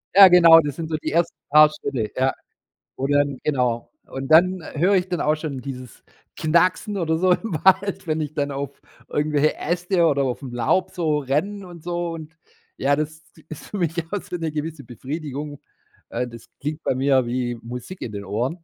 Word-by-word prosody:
Ja, 195 -1 +11
genau, 170 -2 +8
das 145 -3 -2
sind 165 -1 -5
so 155 - -1
die - - -4
ersten 170 +1 +1
paar 150 +1 +7
Schritte, 130 -8 -4
ja, 130 +1 +1 0.6
wo 135 - -2
dann 145 -2 +1
genau 125 -5 0 0.2
und 135 0 -6
dann, 180 +3 +5
äh, 155 - -9
höre 190 +4 +4
ich 185 0 0
dann 175 - -1
auch 150 +1 +2
schon 150 -4 -5
dieses 130 -2 -9 0.3
Knacksen 180 +6 +2
oder 160 -2 0
so 185 +1 +2
im 210 -3 -3
Wald, 190 0 +3
wenn 155 0 0
ich 150 0 -4
dann 145 -1 -1
auf 140 0 -5 0.3
irgendwelche 150 0 +1
Äste 175 +1 +1
oder 140 -3 +2
auf'm 130 -1 -3
Laub 120 +10 +1
so 160 -5 0
renne 180 +9 -2
und 170 -3 -12
so. 175 -1 -2
Und 160 0 -10 0.4
ja, 140 +2 +2
das 155 +1 -4 0.3
ist 155 - -9
für 205 - -6
mich 165 -1 -1 0.2
auch 205 - -1
so - - -7
'ne 165 -2 -3
gewisse 155 -1 -5
Befriedigung, 145 +3 -6 0.5
äh, 125 - -2
das 115 -1 -12 0.2
klingt 150 +3 -4
bei - - +1
mir 130 -1 +2
wie 120 0 -2
Musik 125 +10 -8
in 110 - -5
den 100 0 -5
Ohren 125 - -3
155 Hz, 195 wpm, -23 LUFS, 135-170 Hz, 0.6 s, Ja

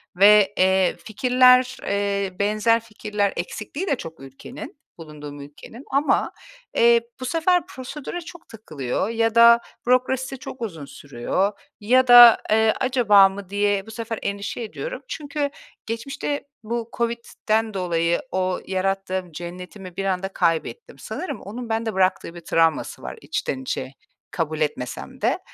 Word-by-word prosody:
ve, 205 +1 +6
eee, 190 0 +3
fikirler, 255 +2 +4
eee, 200 -2 -2
benzer 215 +3 +2
fikirler 210 -2 -3
eksikliği 220 - -5
de 280 - +2
çok 165 - -9
ülkenin, 135 - -10 0.2
bulunduğum 150 -3 -10
ülkenin. 150 - -12
Ama, 280 +2 +1 0.4
eee, 235 0 +5 0.2
bu 255 - -5
sefer 335 +5 +1
prosedüre 280 +6 -7
çok 335 +1 -13
takılıyor 160 - -4
ya 225 -1 0
da 235 0 +8 0.3
bürokrasisi 260 +1 +1
çok 260 - -9
uzun 165 -10 -5
sürüyor. 145 +9 -2 0.3
Ya 255 +5 +3
da, 240 -1 +10
eee, 220 0 +4
"Acaba 210 -7 +5
mı?" 195 -1 -9
diye 205 -1 0
bu - - -9
sefer 225 0 -5
endişe 200 +3 -4
ediyorum. - - -6
Çünkü 290 -1 -3 0.4
geçmişte 270 +5 -4 0.2
bu 235 +1 -4
Covid'den 225 -2 -1
dolayı 170 -2 0
o 185 -1 -1
yarattığım 190 -1 -2
cennetimi 180 +2 -9
bir 195 - -2
anda 190 0 -1
kaybettim. 165 - -1
Sanırım 290 - -6
onun 230 +4 -7
bende 225 0 -1
bıraktığı 185 -2 0
bir 170 - -9
travması 165 -1 0
var - - -7
içten 130 - -3
içe 130 0 -4 0.4
kabul 160 -2 -3
etmesem 125 -4 -4
de. - - +1
210 Hz, 135 wpm, -23 LUFS, 185-240 Hz, 0.4 s, da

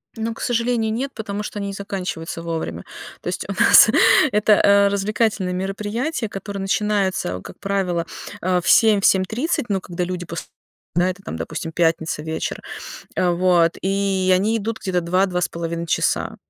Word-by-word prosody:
Ну, 225 0 -3
к - - -11
сожалению, 235 -2 0
нет, 270 +4 -3
потому 210 -1 -5
что 210 - -6
они 200 - -3
не 200 - -4
заканчиваются 180 -4 -5
вовремя. 165 -1 -4 0.4
То - - -9
есть - - -3
у - - -4
нас - - +8 0.4
это, 210 +1 +4
э, 200 0 +5
развлекательное 200 -1 0
мероприятие, 210 - -3
которое 200 0 -6
начинается, 195 - 0
как - - -12
правило, 190 -4 -1 0.4
э, 180 0 +1
в 185 - -1
7, 215 -3 +5
в - - +1
7:30, 225 - +1
но 195 -2 0
когда 175 0 -4
люди 180 0 -4
пос 165 0 -6 0.5
да, 175 +2 +3
это 185 - -12
там, 80 - -6
допустим, 85 - -5
пятница, 160 -2 0
вечер. 160 0 -3 0.6
А, 180 -1 +2
вот, 175 -1 +3
и 195 -1 +1
они 205 +5 +2
идут 225 +1 -3
где-то 185 -3 -1
2, 185 +3 +2
2,5 170 -2 -3
часа. - - 0
195 Hz, 165 wpm, -21 LUFS, 175-210 Hz, 0.6 s, нас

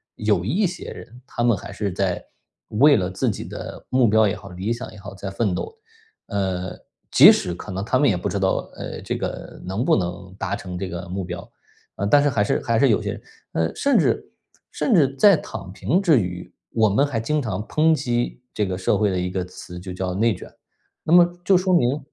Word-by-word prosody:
有 105 -5 +1
一 180 - +1
些 180 - -5
人， 120 +2 -12
他 120 - -3
们 120 -4 +3
还 100 - -9
是 100 -1 -2
在 90 -1 -1 0.4
为 140 +7 +5
了 90 -3 -1
自 95 - 0
己 - - -6
的 - - -8
目 130 -2 +4
标 110 0 +4
也 100 - -1
好， 100 - -11
理 95 +4 -4
想 120 +2 -4
也 105 - -12
好， 100 0 -9
在 95 0 -6
奋 95 -2 0
斗。 - - -4 0.5
呃， 95 -2 -2 0.3
即 - - +10
使 90 - 0
可 100 - -8
能 95 +1 -3
他 120 +5 +1
们 145 - +4
也 105 - +3
不 90 - -2
知 - - -2
道， 95 -1 0
呃， - - -6
这 - - -3
个 - - -6
能 95 +6 -2
不 - - +4
能 90 0 -4
达 95 +1 -2
成 90 -3 -7
这 95 +1 -3
个 90 0 -6
目 95 +1 -3
标， 90 +4 -7 0.5
呃， 100 - -2
但 145 +8 +5
是 145 - +3
还 115 -6 +1
是 - - 0
还 115 -1 +1
是 135 +2 +4
有 105 - +3
些 - - -4 0.3
呃， 80 0 0
甚 280 - +2
至 - - +1 0.4
甚 255 - 0
至 140 -8 +4
在 200 +6 +7
躺 95 - -8
平 115 - +1
之 165 -9 +5
余， 90 -3 -5 0.2
我 110 -1 +4
们 120 +8 +3
还 125 -5 -2
经 150 +7 0
常 105 -5 -3
抨 160 +1 +3
击 120 -6 -1
这 105 - 0
个 90 -1 -3
社 95 - +1
会 105 -1 +3
的 95 - -1
一 90 0 -2
个 95 -1 -2
词 90 0 -10
就 90 +1 -7
叫 90 0 -3
内 110 +3 +2
卷。 - - -10 0.6
那 - - -3
么， 175 0 +8 0.2
就 190 0 +5
说 185 +1 +1
明 140 -4 +3
105 Hz, 245 characters per minute, -23 LUFS, 95-130 Hz, 0.6 s, 即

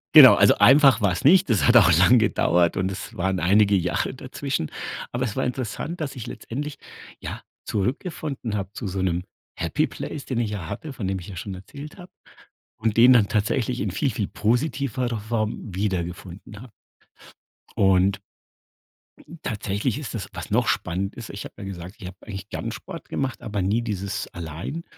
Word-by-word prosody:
Genau, - - +12
also, - - +5
einfach 135 -3 +6
war's 90 -4 +1
nicht. 175 +2 +6
Das 110 - +3
hat 120 0 +7
auch 95 -6 +7
lang 105 +8 +6
gedauert 90 -5 +2
und 95 0 0
es 95 - -7
waren 95 +1 0
einige 100 +3 +4
Jahre 90 +6 0
dazwischen. 130 - -4 0.4
Aber 120 - -1
es 110 -5 -2
war - - +1
interessant, 130 +7 -4
dass 145 -2 -4
ich 120 - -6
letztendlich, 140 +4 -6 0.4
ja, - - -6 0.2
zurückgefunden 130 - -3
habe 100 -1 -4
zu 110 - -5
so 95 0 -3
'nem 90 -1 0 0.3
Happy - - 0
Place, 145 - -6
den 125 -3 -2
ich 115 -3 0
ja 95 -6 -5
hatte, 155 - -6
von 110 -7 -4
dem 95 0 -1
ich 90 - -10
ja 95 - -8
schon 95 +3 -5
erzählt 140 - -10
habe 180 -1 -12 0.7
und 110 -1 -1
den 125 +2 +8
dann 115 -4 +5
tatsächlich 115 +3 0
in 100 - -1
viel, 130 - 0
viel 110 -5 -2
positiverer 125 0 -1
Form 110 -2 -3
wiedergefunden 95 +1 -4
habe 125 -1 -12 1.1
und 95 +1 +3 1.2
tatsächlich 105 +1 -2
ist 145 -4 -6
das 105 -5 -4
was - - -7
noch - - +2
spannend 95 +3 -1
ist, 120 -3 -8
ich 100 - -7
habe - - -10
ja - - -7
gesagt, 95 0 -7
ich 95 - -7
habe 95 +1 -10
eigentlich 100 -1 -8
gerne 115 - -4
Sport 165 +11 -9
gemacht, 135 -2 -3
aber 105 -2 -3
nie 105 +6 +1
dieses 100 -2 -3
allein 85 - -6
105 Hz, 180 wpm, -24 LUFS, 95-125 Hz, 1.2 s, Genau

